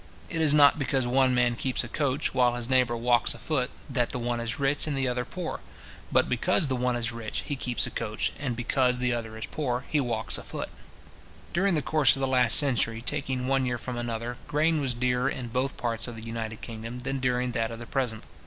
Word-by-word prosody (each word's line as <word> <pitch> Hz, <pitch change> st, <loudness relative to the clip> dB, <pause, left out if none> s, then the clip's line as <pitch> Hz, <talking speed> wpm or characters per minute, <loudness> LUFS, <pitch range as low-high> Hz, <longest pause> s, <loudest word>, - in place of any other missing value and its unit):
It 165 Hz, -2 st, -1 dB
is 155 Hz, -2 st, +4 dB
not 145 Hz, +1 st, +6 dB
because 135 Hz, -2 st, 0 dB
one 130 Hz, +1 st, +3 dB
man 120 Hz, -1 st, +2 dB
keeps 130 Hz, +2 st, -1 dB
a -, -, -6 dB
coach, 140 Hz, +2 st, -1 dB
while 125 Hz, -2 st, +3 dB
his 120 Hz, -1 st, -1 dB
neighbour 125 Hz, -2 st, +2 dB
walks 120 Hz, 0 st, +2 dB
a -, -, -10 dB
foot, 125 Hz, +1 st, -1 dB, 0.2 s
that 125 Hz, -4 st, 0 dB
the -, -, -3 dB
one 120 Hz, 0 st, -2 dB
is 115 Hz, +2 st, -2 dB
rich, 140 Hz, +2 st, +1 dB
and 145 Hz, -2 st, -1 dB
the 135 Hz, -1 st, +1 dB
other 125 Hz, 0 st, -1 dB
poor; 180 Hz, -2 st, -5 dB, 0.5 s
but -, -, +4 dB
because 155 Hz, +7 st, +2 dB
the 130 Hz, -, 0 dB
one 125 Hz, 0 st, 0 dB
is 120 Hz, -1 st, 0 dB
rich, 115 Hz, -2 st, -4 dB
he 145 Hz, -, -2 dB
keeps 125 Hz, -2 st, 0 dB
a -, -, -5 dB
coach, 110 Hz, -2 st, -2 dB
and 130 Hz, -5 st, -2 dB
because 125 Hz, +1 st, +1 dB
the 125 Hz, 0 st, 0 dB
other 110 Hz, -2 st, -4 dB
is 110 Hz, -, -4 dB
poor, 130 Hz, -4 st, -3 dB
he 150 Hz, -, +2 dB
walks 115 Hz, -4 st, +1 dB
a -, -, -9 dB
foot. -, -, -5 dB, 0.8 s
During 190 Hz, +1 st, +2 dB
the 150 Hz, -, 0 dB
course 150 Hz, -5 st, +4 dB
of -, -, -6 dB
the 135 Hz, -, 0 dB
last 130 Hz, -1 st, +5 dB
century, 120 Hz, -5 st, +2 dB
taking 130 Hz, -3 st, -1 dB
one 135 Hz, 0 st, +1 dB
year 125 Hz, -, 0 dB
with 125 Hz, +1 st, -5 dB
another, 120 Hz, 0 st, -4 dB
grain 155 Hz, +1 st, +2 dB
was 130 Hz, -3 st, -1 dB
dearer 125 Hz, +2 st, +1 dB
in 125 Hz, -4 st, -5 dB
both 130 Hz, +3 st, -1 dB
parts 115 Hz, -2 st, -2 dB
of 120 Hz, -, -7 dB
the 110 Hz, -, -9 dB
united 115 Hz, -1 st, -5 dB
kingdom 115 Hz, +2 st, -7 dB
than 135 Hz, +1 st, -2 dB
during 125 Hz, -1 st, 0 dB
that 115 Hz, -2 st, -1 dB
of 115 Hz, -, -6 dB
the 120 Hz, -, -8 dB
present. 120 Hz, -4 st, -1 dB
125 Hz, 235 wpm, -27 LUFS, 120-135 Hz, 0.8 s, not